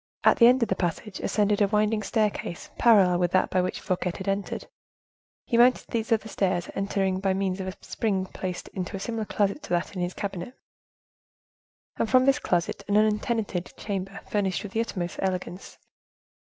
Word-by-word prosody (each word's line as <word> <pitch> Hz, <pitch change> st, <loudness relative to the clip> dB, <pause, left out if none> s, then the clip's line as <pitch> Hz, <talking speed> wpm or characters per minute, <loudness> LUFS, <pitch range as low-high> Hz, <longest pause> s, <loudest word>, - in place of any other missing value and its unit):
At -, -, +5 dB
the 235 Hz, -, +8 dB
end 250 Hz, 0 st, +5 dB
of 225 Hz, -, -1 dB
the 190 Hz, -, +1 dB
passage 190 Hz, +3 st, -3 dB
ascended 210 Hz, 0 st, +1 dB
a 205 Hz, -, +5 dB
winding 210 Hz, +1 st, +1 dB
staircase 210 Hz, -5 st, -2 dB
parallel 195 Hz, -7 st, +5 dB
with 175 Hz, -1 st, +2 dB
that 185 Hz, -, +2 dB
by 185 Hz, -, +3 dB
which 185 Hz, -, -2 dB
Fouquet 180 Hz, -2 st, -2 dB
had 190 Hz, -, -7 dB
entered. 195 Hz, 0 st, -2 dB, 0.8 s
He 235 Hz, -, 0 dB
mounted 250 Hz, +1 st, +4 dB
these 225 Hz, -2 st, -2 dB
other 220 Hz, -1 st, +2 dB
stairs, 185 Hz, -4 st, -1 dB
entered 195 Hz, -1 st, -1 dB
by 195 Hz, -1 st, +1 dB
means 190 Hz, -1 st, -1 dB
of 190 Hz, -, -4 dB
a 185 Hz, -, -5 dB
spring 195 Hz, -4 st, -1 dB
placed 185 Hz, -1 st, -5 dB
in 190 Hz, -, -5 dB
a -, -, -2 dB
closet 195 Hz, -, -6 dB
similar 225 Hz, -2 st, -3 dB
to 205 Hz, +7 st, -1 dB
that 175 Hz, +3 st, -1 dB
in 180 Hz, -, -3 dB
his 175 Hz, +1 st, -2 dB
cabinet, 195 Hz, +4 st, -5 dB, 1.4 s
and 220 Hz, -, 0 dB
from 255 Hz, 0 st, +5 dB
this 275 Hz, +1 st, +4 dB
closet 175 Hz, -8 st, -1 dB
an 205 Hz, -, +1 dB
untenanted 215 Hz, -3 st, 0 dB
chamber 195 Hz, -1 st, -4 dB
furnished 195 Hz, -3 st, -1 dB
with 205 Hz, -, -7 dB
the 225 Hz, -, 0 dB
utmost 180 Hz, -6 st, -4 dB
elegance. 185 Hz, -1 st, -3 dB
195 Hz, 185 wpm, -26 LUFS, 185-215 Hz, 1.4 s, the